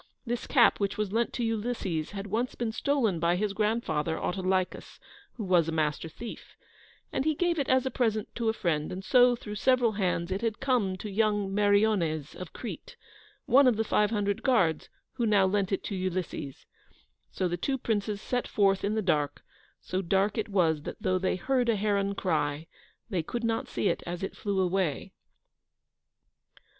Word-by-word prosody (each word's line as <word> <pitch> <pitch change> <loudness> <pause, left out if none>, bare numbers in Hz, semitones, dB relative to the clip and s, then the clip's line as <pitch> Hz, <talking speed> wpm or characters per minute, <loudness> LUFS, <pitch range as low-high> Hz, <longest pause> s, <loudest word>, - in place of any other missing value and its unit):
This 240 0 -3
cap 245 -5 +5
which 200 -1 -1
was 210 -2 -1
lent 235 +1 +1
to 245 - -2
Ulysses 220 -8 -2
had 200 -1 -6
once 225 +5 -2
been 235 -2 -2
stolen 225 - 0
by 170 +1 +2
his 200 +2 -1
grandfather, 210 -8 0
Autolycus, 185 0 -2 0.3
who 225 - -6
was 175 -4 +3
a - - -1
Master 155 0 -1
Thief, 230 +8 -9 0.6
and - - 0
he 310 +1 +1
gave 345 0 +1
it 275 - -1
as 260 0 +3
a 265 - -1
present 220 -4 0
to 230 -2 0
a - - +1
friend, 160 -6 -1
and 190 +2 -6
so, 245 -1 +5
through 210 -3 -8
several 245 +2 +3
hands, 185 -4 -1
it 190 +2 -1
had 225 -1 -1
come 245 -9 +1
to 215 - -6
young 205 -1 +1
Meriones 200 -7 +2
of 180 -2 -8
Crete, 235 - -8 0.5
one 270 +1 +6
of 245 - +4
the 225 - +2
five 210 -1 +2
hundred 205 -2 -1
guards, 185 - +2 0.3
who 235 - +1
now 205 -3 +4
lent 195 0 0
it 195 - -1
to 200 - -4
Ulysses. 185 -7 -4 0.6
So 185 - -1
the 175 - -1
two 265 +10 -1
princes 210 -4 -1
set 245 +3 -2
forth 195 -2 +2
in 210 +2 0
the 220 - 0
dark, 150 -6 0 0.4
so 185 +1 -2
dark 195 +3 +1
it 220 -2 -2
was 165 -6 +2
that - - -7
though 185 0 +1
they 185 - 0
heard 250 +5 0
a 230 - +3
heron 200 -1 0
cry, 155 -4 -1 0.5
they 180 -4 +1
could 235 +9 -5
not 230 +3 -1
see 205 - -1
it - - 0
as 175 +1 -4
it 195 - -4
flew 200 -2 -1
away. 180 -5 -1
205 Hz, 190 wpm, -28 LUFS, 185-230 Hz, 0.6 s, one